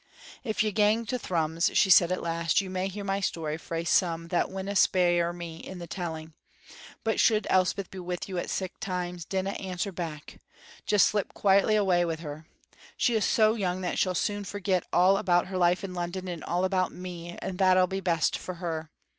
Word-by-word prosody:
"If 220 -3 0
you 215 - 0
gang 215 +2 +2
to 250 +3 -2
Thrums," 165 -2 0
she 190 - +4
said 175 -1 +7
at 185 - -2
last, 165 +1 +1
"you 190 -2 -4
may 185 0 -1
hear 200 +1 -6
my 195 0 -1
story 160 -5 -2
frae 165 0 -4
some 165 -1 +1
that 175 - +1
winna 195 +1 -4
spare 175 -3 +3
me 170 -2 -7
in 185 +2 -9
the 175 - -7
telling; 160 -3 -6 0.7
but 225 -1 0
should 215 -2 +3
Elspeth 185 +1 +1
be 190 - -8
wi' 180 0 -3
you 185 -2 -4
at - - -4
sic 185 -1 -4
times, 180 -2 -4
dinna 190 +2 -2
answer 190 0 -4
back; 165 -4 -7 0.5
just 210 -3 +5
slip 205 -2 -1
quietly 200 +2 +4
away 190 -4 +3
wi' 165 -2 -1
her. 155 -1 -8 0.5
She's 220 -5 +2
so 215 -1 +4
young 185 -4 -2
that 180 - -2
she'll 185 -1 +1
soon 205 +3 -1
forget 190 -2 -1
all 185 +3 +5
about 175 -2 +2
her 190 - -3
life 175 +1 +3
in 190 -2 -5
London 180 +1 -4
and 175 -3 -5
all 180 +2 0
about 185 -1 0
me, 175 -1 -8
and 185 -1 -5
that'll 185 -1 +5
be 190 +1 -3
best 170 -4 +1
for 185 - -6
her. 165 -3 -4
185 Hz, 200 wpm, -28 LUFS, 170-195 Hz, 0.7 s, said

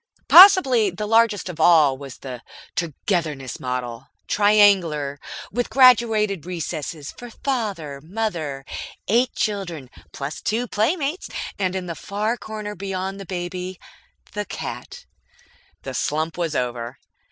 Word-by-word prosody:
Possibly 275 - +8
the 195 +4 -5
largest 225 -2 +3
of 175 -3 -7
all 155 -4 +5
was 135 -1 -10
the 125 -3 -8 0.3
"Togetherness" 155 -4 -2
model, 125 -2 -4 0.2
triangular, 190 -9 +3 0.3
with 245 +3 -2
graduated 220 - +4
recesses 160 -4 -5
for 245 - -11
Father, 200 - -3
Mother, 165 -8 -3 0.4
eight 240 +5 +2
children 175 - -3 0.2
(plus 140 +2 -6
two 235 +3 -1
playmates), 290 - -1 0.3
and, 185 -1 0
in 185 -1 -3
the 170 - -4
far 210 +6 -2
corner 215 -2 -6
beyond 195 0 -4
the 195 - -9
baby, 180 0 -5 0.5
the 210 +1 -3
cat. - - -7 0.8
The - - -6
slump 155 +2 -1
was 165 -3 -2
over. 120 -1 -3
185 Hz, 120 wpm, -22 LUFS, 150-215 Hz, 0.8 s, Possibly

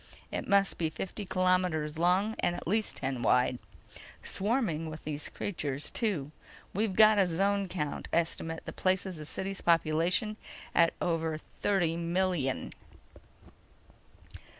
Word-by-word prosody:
It - - -3
must 200 -1 +3
be 165 -2 +1
fifty 195 +5 -5
kilometers 180 -5 +1
long 185 +5 +3
and 175 - +1
at - - -7
least 215 +4 +1
ten 130 -2 -3
wide. 125 +1 +3 0.6
Swarming 195 - -1
with 155 0 -8
these 150 -1 -4
creatures, 145 -7 -3
too. 175 - -1 0.4
We've 205 -1 0
got 215 0 +7
a 190 - +4
zone 195 +3 +1
count 150 -5 -3
estimate 165 -1 -1
that - - -8
places 185 -1 0
the 155 - -7
city's 190 +5 -4
population 170 +6 +2 0.4
at 170 -1 +4
over 165 -2 0
thirty 175 0 0
million." 170 -5 -1
175 Hz, 125 wpm, -30 LUFS, 155-195 Hz, 0.6 s, got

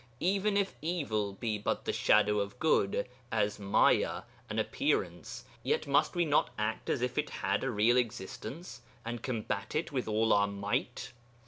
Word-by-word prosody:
Even 200 +3 +2
if 200 -1 +1
evil 135 - -1
be 105 +1 -2
but - - -2
the - - 0
shadow 105 0 +3
of 100 +4 -3
good, 125 -8 +2 0.2
a - - -2
M̬aya, 105 -2 +2 0.3
an - - -4
appearance, 85 -1 -1 0.2
yet - - 0
must 140 +5 +2
we 175 -1 +2
not 145 -4 +3
act 110 +1 -2
as 125 - 0
if 125 +3 -1
it 150 - -1
had 100 +1 -1
a - - 0
real 115 +2 +3
existence, 120 - -4 0.2
and 120 -1 -4
combat 110 -4 -3
it 155 - -1
with 130 -5 -2
all 110 +1 +2
our 100 0 +4
might? 100 +4 -3
115 Hz, 165 wpm, -31 LUFS, 105-145 Hz, 0.3 s, our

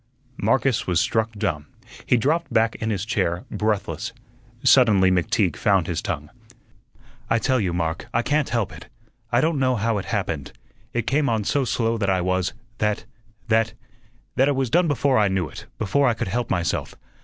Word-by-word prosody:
Marcus 115 +3 +1
was 90 -2 +2
struck 110 +4 +1
dumb; 75 -8 -2 0.4
he 125 - +4
dropped 155 +8 0
back 115 0 +3
in 110 - -3
his 100 -2 -2
chair 90 -5 -1
breathless. 105 -2 -2 0.5
Suddenly 105 -8 +5
McTeague 90 -3 +1
found - - +2
his - - -2
tongue. - - -4 1.0
"I 115 - +3
tell 130 +2 +1
you, 95 -5 0
Mark, 85 -1 -2
I 120 - +1
can't 145 +2 +1
help 115 -4 -1
it. 110 - -11 0.4
I 120 +1 +3
don't 160 -1 +1
know 130 -1 +2
how 110 -1 0
it 95 - -6
happened. - - -3 0.4
It 120 -2 -2
came 140 +3 +1
on 110 -2 0
so 135 +6 +1
slow 115 -2 0
that 100 -2 0
I 95 -1 +2
was, 95 0 0 0.3
that 105 +1 0 0.4
that 110 0 +2 0.6
that 135 - +4
it 145 - +2
was 130 -3 -1
done 175 +3 +4
before 140 -3 +2
I 105 - +4
knew 95 -3 0
it, - - -11
before 130 +7 +2
I 120 - +2
could 100 - -3
help 120 +3 -2
myself. 90 -2 -1
110 Hz, 185 wpm, -23 LUFS, 95-130 Hz, 1.0 s, Suddenly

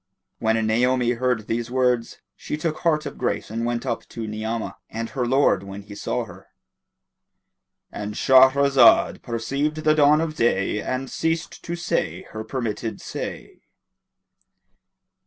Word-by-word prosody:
When 110 0 +2
Naomi 120 +2 +2
heard 125 -2 0
these 115 +1 -2
words, 125 -2 0
she 150 - -5
took 155 0 -2
heart 155 -3 +1
of 140 - -7
grace 125 - -2
and 115 +1 -2
went 120 0 -2
up - - -2
to 115 -1 -6
Ni'amah; 110 +1 -4
and 115 0 -5
her 125 -2 -1
lord 130 -7 +3
when 100 +1 -8
he 100 +1 -11
saw - - -2
her.—And 105 0 -14
Shahrazad 130 -1 +5
perceived 140 +6 -2
the 155 - +5
dawn 150 0 +5
of 160 -1 -1
day 105 -5 +1
and 130 +1 -3
ceased 165 +4 -2
to 170 - -3
say 175 - -2
her 110 0 -5
permitted 115 -2 -4
say. - - -7
125 Hz, 140 wpm, -23 LUFS, 115-140 Hz, -, Shahrazad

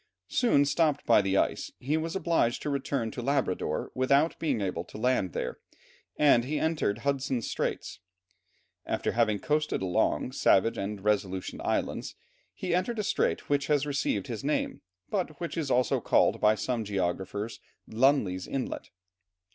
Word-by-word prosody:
Soon 145 - +3
stopped 150 0 +1
by 115 - +6
the 95 0 0
ice, - - 0
he 140 +5 -1
was 160 +2 -2
obliged 165 -10 +1
to 150 - -1
return 135 -4 -1
to 125 - -5
Labrador 135 -7 -1
without 140 +5 +2
being 145 -8 0
able 90 -4 -2
to - - -11
land 110 -6 +1
there, - - -3 0.6
and 140 -5 +5
he 150 +5 -2
entered 160 -10 0
Hudson's 135 -4 0
Straits. - - -3 0.9
After - - -1
having 115 -3 +2
coasted 150 -2 0
along 90 -2 +1
Savage 105 +4 +3
and 100 0 -4
Resolution 100 -3 -1
Islands, - - -2 0.4
he 180 -2 -3
entered 185 +7 0
a 210 - 0
strait - - 0
which 145 -1 +1
has 145 -2 +2
received 135 -8 -1
his 115 -4 -5
name, 150 +2 -1 0.3
but 175 -7 -2
which 170 - -4
is 160 -5 -2
also 125 0 +2
called - - +3
by 105 0 +5
some 120 +1 -2
geographers, 100 +2 -3 0.3
Lunley's 110 -7 +2
inlet. 135 -2 -4
130 Hz, 155 wpm, -29 LUFS, 105-150 Hz, 0.9 s, by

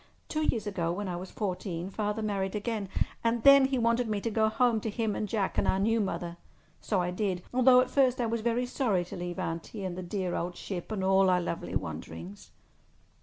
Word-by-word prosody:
Two 310 - -1
years 235 -8 0
ago, 175 -5 -1
when 200 +3 -3
I 180 - -3
was 180 +2 -6
fourteen, 185 -3 -4
Father 210 +1 -2
married 195 -2 -1
again, 210 -2 -2 0.3
and 230 0 +1
then 275 -1 +8
he 265 0 0
wanted 235 0 +2
me 210 -1 0
to 230 - -2
go 220 0 +3
home 235 0 +2
to 220 - -2
him 220 -1 -1
and 210 - -3
Jack 200 -3 -1
and - - +2
our - - +3
new 225 +4 +2
mother. 175 -3 -3 0.4
So 200 - 0
I 180 0 -1
did, 180 -2 -2
although 255 0 +6
at 255 0 -2
first 260 -3 +3
I 240 - +1
was 230 0 -1
very 235 +2 +1
sorry 225 -8 0
to - - -8
leave 175 -1 -5
Auntie 165 +5 -4
and 180 -2 -3
the 185 - -5
dear 180 0 -3
old 175 +1 -2
ship 185 +1 -6
and 200 -3 -2
all 190 0 +4
our 180 -1 +4
lovely 170 -1 -4
wanderings." 90 +3 -6
205 Hz, 220 wpm, -29 LUFS, 180-230 Hz, 0.4 s, then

